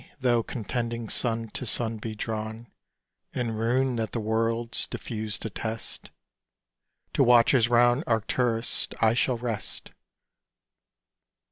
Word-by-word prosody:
tho' 120 -3 +3
contending 115 -1 -3
sun 115 -2 0
to 105 - -5
sun 115 0 -1
be 110 0 -5
drawn 110 +1 -4 0.7
In 120 -3 -1
ruin 120 +3 +1
that 110 -1 -2
the 120 - -1
worlds 115 +2 0
diffused 110 -3 -4
attest 110 +1 -5 1.0
To - - +4
watchers 120 0 +5
round 120 +3 +4
Arcturus, 115 +1 0
I 110 0 +4
shall 125 +1 +1
rest! 115 -3 -5
115 Hz, 110 wpm, -27 LUFS, 110-120 Hz, 1.0 s, watchers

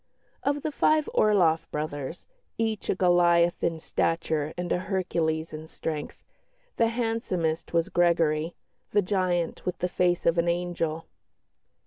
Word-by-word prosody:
Of 285 0 -1
the 310 - -1
five 310 +1 +2
Orloff 170 -6 +3
brothers, 150 +1 -4 0.3
each 220 -2 -2
a - - +2
Goliath 175 -2 +3
in 165 - +1
stature 160 -2 -1
and 175 0 -3
a - - +2
Hercules 165 -4 -1
in 155 +1 -7
strength, 155 -2 -5 0.5
the 230 - +4
handsomest 225 -9 -1
was 170 -1 +1
Gregory, 165 -2 +2 0.3
"the 205 - +2
giant 180 -3 0
with 180 -1 -2
the 180 - -1
face 180 -1 +1
of 170 0 +3
an 170 - +1
angel." 170 -2 -1
175 Hz, 135 wpm, -27 LUFS, 160-185 Hz, 0.5 s, the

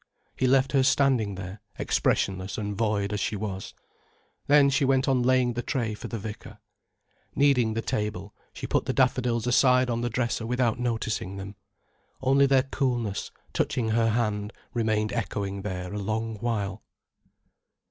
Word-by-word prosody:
He 130 - +1
left 135 +1 +3
her 135 - +4
standing 130 -6 +2
there, 95 +1 -7 0.2
expressionless 95 0 0
and 105 -1 -3
void 105 -1 0
as 105 - -1
she 105 +2 -1
was. 95 -2 -5 0.7
Then 145 -1 +6
she 135 +1 +2
went 135 0 +2
on 130 -2 +3
laying 125 -1 +3
the 120 - -2
tray 120 -5 -2
for 105 - -7
the 115 - -4
vicar. 105 0 -8 0.8
Needing 125 -6 +3
the 115 - -2
table, 105 -1 -3 0.2
she - - -7
put - - 0
the - - -1
daffodils 120 -3 +1
aside 125 0 +4
on 115 0 -1
the 120 - -1
dresser 115 -1 -1
without 125 -1 +1
noticing 110 -5 -2
them. 100 +1 -7 0.7
Only 135 +1 +4
their 135 -1 +4
coolness, 120 -7 -2 0.2
touching 115 -3 0
her 115 +1 +2
hand, 105 -2 -1 0.2
remained 110 -2 0
echoing 100 -2 -3
there 90 -2 -5
a 105 - -3
long 110 +2 -2
while. 105 -3 -2
115 Hz, 160 wpm, -27 LUFS, 105-125 Hz, 0.8 s, Then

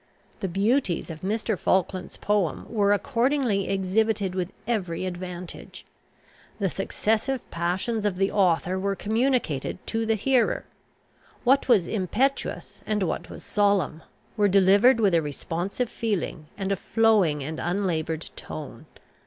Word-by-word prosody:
The 190 - -2
beauties 195 -1 +1
of 155 0 -9
Mr. 215 +3 -1
Falkland's 185 +1 0
poem 205 -6 0
were 205 -3 +2
accordingly 240 -2 +1
exhibited 195 +1 +1
with 185 -1 -2
every 185 -7 -1
advantage. 180 -1 -7 0.7
The 195 -3 0
successive 220 +7 -1
passions 185 +6 -1
of 205 -3 0
the 195 +1 +1
author 185 -1 +2
were 195 +1 -1
communicated 220 - 0
to 225 0 -2
the 225 - +3
hearer. 250 +3 +1 0.8
What 270 +3 +4
was 210 -9 +4
impetuous, 230 +8 -1
and 210 -2 +1
what 165 - -3
was - - -10
solemn, 200 -6 +1 0.4
were 205 -1 +4
delivered 200 +6 +5
with 200 -5 +3
a 165 - +4
responsive 170 - -3
feeling, 185 -8 -2
and 195 -1 -2
a - - +3
flowing 200 -11 +2
and 155 +3 -5
unlaboured 170 -3 -2
tone. - - -8
200 Hz, 130 wpm, -26 LUFS, 180-225 Hz, 0.8 s, delivered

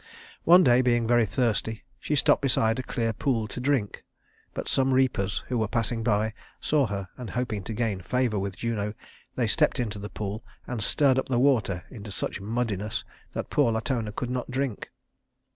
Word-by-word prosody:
One 180 +2 +8
day, 125 -3 +5
being 120 -2 +2
very 120 -1 +3
thirsty, 110 0 0 0.2
she 150 - -1
stopped - - +4
beside 115 -4 +2
a - - +1
clear 115 -3 -1
pool 115 -1 0
to 115 - -7
drink; 125 -5 0 0.5
but - - -4
some 135 -1 +2
reapers 120 -7 +1
who 125 -2 -1
were 110 - +1
passing 115 +1 -1
by 110 -1 +1 0.3
saw 145 -4 +2
her, 100 -2 -4
and 125 - -6
hoping 115 -5 -2
to 110 - -4
gain 105 -5 -1
favor 120 +1 0
with 95 -1 -4
Juno 105 -2 -2 0.4
they - - +1
stepped - - +2
into 110 -4 -2
the 105 +1 -6
pool 105 +2 -5 0.2
and 120 -3 -4
stirred 135 +4 +3
up - - -4
the 125 - +2
water 120 -9 +2
into 110 -4 -8
such 95 - -3
muddiness 105 -1 -2 0.3
that - - -4
poor 140 -6 +3
Latona 110 -1 -1
could 120 +3 -4
not 125 0 -3
drink. 130 -3 -2
115 Hz, 185 wpm, -27 LUFS, 105-125 Hz, 0.5 s, One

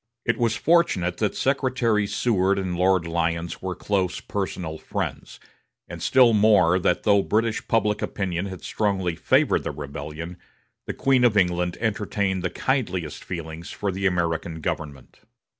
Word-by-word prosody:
It 120 - 0
was 115 -2 +2
fortunate 125 - +2
that 105 -2 -1
Secretary 125 -6 +1
Seward 100 -2 +1
and 95 -2 -2
Lord 90 -1 +2
Lyons 85 0 -2
were 95 -1 -3
close 95 -3 -1
personal 90 -5 -4
friends, - - -5 0.5
and - - -8
still 125 -3 +5
more 100 -5 +4
that 90 0 +1
though 100 -2 +4
British 115 +3 0
public 105 -3 +1
opinion 95 -1 -2
had 95 -2 -8
strongly 95 -5 -1
favored - - +2
the - - -3
rebellion, 75 +4 -7 0.5
the - - -4
Queen 135 -2 +3
of 115 -4 +4
England 90 -2 +1
entertained 100 -3 -1
the 90 - -1
kindliest 95 - -2
feelings 85 -1 -6
for 100 -1 -3
the 95 +1 0
American 85 -2 -1
government. 70 -3 -5
95 Hz, 145 wpm, -24 LUFS, 85-110 Hz, 0.5 s, still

